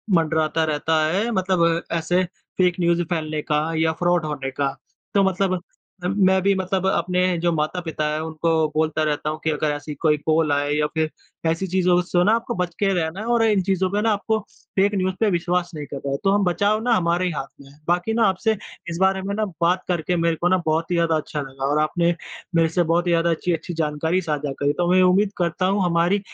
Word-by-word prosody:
मंडराता 160 -1 +1
रहता 155 +1 +1
है 200 +8 0
मतलब 180 -4 +1
ऐसे 175 +2 +1
फ़ेक 180 -1 -1
न्यूज़ 170 0 +2
फैलने 155 -3 -2
का 150 0 0 0.2
या 160 0 +2
फ़्रॉड 175 -2 +2
होने 140 -3 -4
का। 135 0 -2 0.4
तो 200 -1 +4
मतलब 190 0 +1 0.5
अ, 180 - 0
मैं 190 -1 +3
भी 200 +2 +3
मतलब 190 0 -1
अपने 180 0 +1
जो 170 +1 +1
माता-पिता 160 0 -2
हैं 155 - -1
उनको 160 +1 -2 0.2
बोलता 155 0 +1
रहता 150 0 -1
हूँ 155 0 -4
कि 160 - +1
अगर 150 0 0
ऐसी 145 +1 -6
कोई 150 -1 +4
कॉल 155 0 +1
आए 145 0 +1
या 150 0 +1
फिर 160 -1 0 0.4
ऐसी 165 +4 -1
चीज़ों 180 -1 +2
सो 175 0 +1
ना 210 - +4
आपको 235 0 -3
बच 180 -1 -2
के 200 -1 +2
रहना 170 +2 -2
है 215 - -5
और 230 -1 +3
इन 210 -4 +3
चीज़ों 190 0 0
पे 205 +1 0
ना 225 - +2
आपको 220 +2 0 0.4
फ़ेक 200 +2 +3
न्यूज़ 185 -1 0
पे 220 - +3
विश्वास 175 0 0
नहीं 150 -1 -5
करना 140 -1 -5
है। 140 - 0
तो 195 - +3
हम 205 0 +2
बचाव 205 +5 +1
ना 245 -1 +2
हमारे 175 0 +1
ही 180 - 0
हाथ 135 -3 -4
में 135 - -15
है। 145 - -20
बाकी 175 +5 +1
ना 230 0 +2
आपसे 210 +3 0 0.3
इस 170 - -4
बारे 190 0 +3
में 200 +1 -3
ना 215 0 0 0.2
बात 180 +2 +2
करके 180 0 0
मेरे 165 -1 +1
को 175 - 0
ना 185 - +4
बहुत 160 +2 0
ही 175 - +2
ज़्यादा 165 -1 +2
अच्छा 150 -1 -3
लगा, 135 -1 -5
और 145 +2 +1
आपने 170 +2 +1 0.4
मेरे 165 -1 +4
से 175 +1 +1
बहुत 170 +2 +1
ही - - +2
ज़्यादा 170 0 +2
अच्छी-अच्छी 170 +1 -2
जानकारी 160 +3 0
साझा 150 -3 -2
करी। 145 +1 +1
तो 175 +2 0
मैं 185 0 +5
उम्मीद 195 +3 +3
करता 175 +1 0
हूँ 195 +1 +1
हमारी 175 +4 +2
175 Hz, 230 wpm, -22 LUFS, 155-185 Hz, 0.5 s, मैं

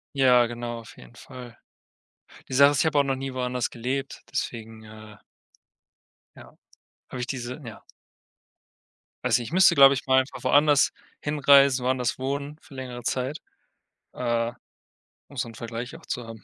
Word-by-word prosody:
Ja, 125 -3 +5
genau, 120 0 -5
auf 110 - -15
jeden - - -15
Fall. 125 -2 -12 0.9
Die - - -5
Sache 140 +2 +7
ist, 145 - -1
ich - - +2
habe 150 -2 +2
auch - - +6
noch 135 -1 -1
nie 135 0 -5
woanders 125 -1 -2
gelebt, 130 +3 -4
deswegen, 110 -1 -5
äh 110 -1 -13 1.2
ja, - - -15 0.5
habe 125 - -7
ich 125 - -4
diese 125 +2 -5
Ja. 115 - -10 1.4
Also, 120 -1 +2
ich 120 - -7
müsste, 190 +1 +6
glaube 135 0 +8
ich 130 - -4
mal 130 0 +4
einfach 130 +1 -5
woanders 145 -1 +4 0.3
hinreisen, 140 -3 +4
woanders 125 -1 0
wohnen 140 +3 -4
für - - -17
längere 125 -2 -7
Zeit, 130 +5 -2 0.8
äh, 120 -1 -1 0.8
um 140 - -16
so 125 -3 -3
'nen 115 - -13
Vergleich 115 +6 -6
auch 165 - -18
zu 125 - -4
haben. 115 -1 -11
125 Hz, 160 wpm, -25 LUFS, 120-140 Hz, 1.4 s, glaube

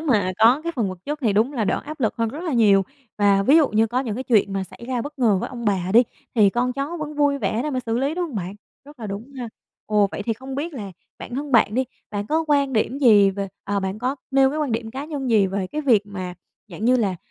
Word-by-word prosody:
mà 215 - +1
có 235 +6 +5
cái 335 0 -3
phần 230 -8 -1
vật 185 -1 -7
chất 295 +1 -3
thì 220 - +2
đúng 220 +7 +2
là 235 -6 -1
đỡ - - 0
áp 305 0 -8
lực 220 -4 0
hơn 230 -1 0
rất 290 +8 -7
là 330 - -2
nhiều. 210 -5 +5 0.4
Và 200 -1 +4
ví 280 +10 +5
dụ 305 -4 +5
như 220 +1 +2
có 245 +3 -1
những 250 -1 -3
chuyện 210 -4 +2
mà 195 -1 -2
xảy 190 - -15
ra 250 -2 -1
bất 290 +1 -8
ngờ 220 -6 +3
với - - -3
ông 240 -2 -7
bà 190 -4 0
đi, 235 - +7 0.3
thì 210 -4 +5
con 250 +3 0
cháu 280 +6 -4
vẫn 305 -2 -5
vui 285 -1 +2
vẻ 235 -2 -1
để 300 - -2
mà 255 -2 -1
xử 225 +1 0
lý, 275 +4 0
đúng 355 0 -1
hông 290 - -10
bạn? 185 +1 -4 0.3
Rất 290 -2 -15
là 220 - -5
đúng 210 +7 -7
ha. 240 -2 -4 0.4
Ồ, 210 -2 +3
vậy 200 - -5
thì 225 - -1
không 260 +4 -8
biết 305 +5 -3
là 200 -6 -6 0.3
bản 240 - -8
thân 285 +1 -4
bạn 225 -3 +4
đi, 260 +1 +1 0.3
bạn 205 -1 -3
có 320 +6 0
quan 280 -2 +2
điểm 245 +4 0
gì 210 -7 +6
về 195 0 -4 0.2
à, 200 0 -1
bạn 190 +2 -3
có 255 +4 -2
nêu 270 0 +4
cái 305 - -3
quan 290 -6 -1
điểm 225 0 -3
cá 265 +4 -5
nhân 285 -5 -4
gì 210 -4 +4
về 195 0 -2 0.2
việc 220 -6 +5
mà 185 -3 -6 0.3
dạng 200 +3 -7
như 255 +1 +4
là, 200 -6 0
235 Hz, 280 wpm, -22 LUFS, 205-275 Hz, 0.4 s, đi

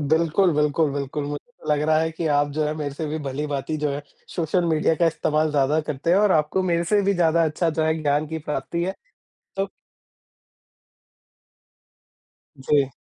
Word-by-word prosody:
बिल्कुल, 170 +3 +3
बिल्कुल, 150 +1 +2
बिल्कुल। 140 +1 -3
मुझे 145 +11 -6
तो 155 - -13
लग 150 - +1
रहा 155 0 +4
है 160 +1 0
कि 165 +1 -4
आप 145 0 +2
जो 155 +1 0
है 150 +1 -1
मेरे 145 -2 -4
से 155 +2 -4
भी 155 +1 -3
भली-भांति 145 +2 -3
जो 150 -1 0
है 140 +1 -4 0.3
सोशल 175 +1 0
मीडिया 160 0 +2
का - - +6
इस्तेमाल 155 -1 +1
ज़्यादा 145 +1 +2
करते 150 +3 -2
हैं 180 - +5
और 205 -2 +4
आपको 155 +4 +1
मेरे 170 -2 +1
से 205 +5 +3
भी 200 +1 +2
ज़्यादा 170 -2 +3
अच्छा 160 +2 0
जो - - +3
है 160 0 +2
ज्ञान 145 +1 +1
की 160 +1 -4
प्राप्ति 150 +4 -2
है, 190 +2 -2 0.6
तो 195 0 0 2.9
जी। 135 0 +2
155 Hz, 185 wpm, -23 LUFS, 145-170 Hz, 2.9 s, का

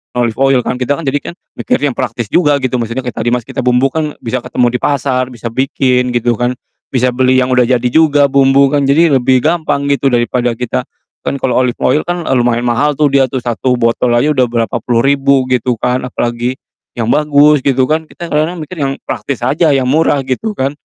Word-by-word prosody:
olive 120 -2 -1
oil 135 -2 +3
kan, - - -2
kita 130 +2 0
kan 165 - -7
jadi 140 +2 0
kan - - -14 0.3
mikir - - 0
yang 145 -1 +1
praktis 120 -3 -3
juga 150 -5 +3
gitu, 130 -1 -1
maksudnya 115 +3 -3
kayak 125 - -5
tadi, 115 - 0
Mas, 125 -1 -1
kita - - -7
bumbukan 135 +5 +1
bisa 120 +2 -2
ketemu 125 - +1
di - - -17
pasar, 130 -3 0
bisa 115 0 -6
bikin, 130 -1 0
gitu 120 -1 0
kan. 120 +1 0 0.4
Bisa 125 -1 +1
beli 130 +1 +2
yang 130 - -3
udah 125 -2 +3
jadi 125 -2 +1
juga 145 -2 +3
bumbukan, 140 +1 +3
jadi 160 +4 +3
lebih 130 0 +2
gampang 155 -3 0
gitu, 140 0 +1
daripada 120 -1 0
kita 115 - -3 0.4
kan - - -1
kalo 125 - +1
olive 125 -2 -1
oil 150 +4 +2
kan, 175 0 -2
eee, - - 0
lumayan 120 0 +1
mahal 140 +5 +1
tuh 150 -1 +3
dia 135 -1 +3
tuh, 130 -1 -4
1 125 +1 -1
botol 120 +1 +1
aja 145 +6 +2
udah 130 -3 +2
berapa 115 -3 -2
puluh 120 -1 +1
ribu 140 -1 +2
gitu 125 -1 +1
kan, 125 +2 -1
apalagi 120 +1 -2 0.4
yang 115 -1 -1
bagus 150 0 +4
gitu 135 0 +1
kan, 160 0 -1
kita 170 +1 -9
kadang-kadang 155 +4 -1
mikir 175 +3 -10
yang 135 -1 0
praktis 135 -3 -4
aja 150 +6 +2
yang 135 - +1
murah 145 +1 +1
gitu 170 - -3
kan. 135 -3 -1
130 Hz, 215 wpm, -13 LUFS, 125-145 Hz, 0.4 s, bagus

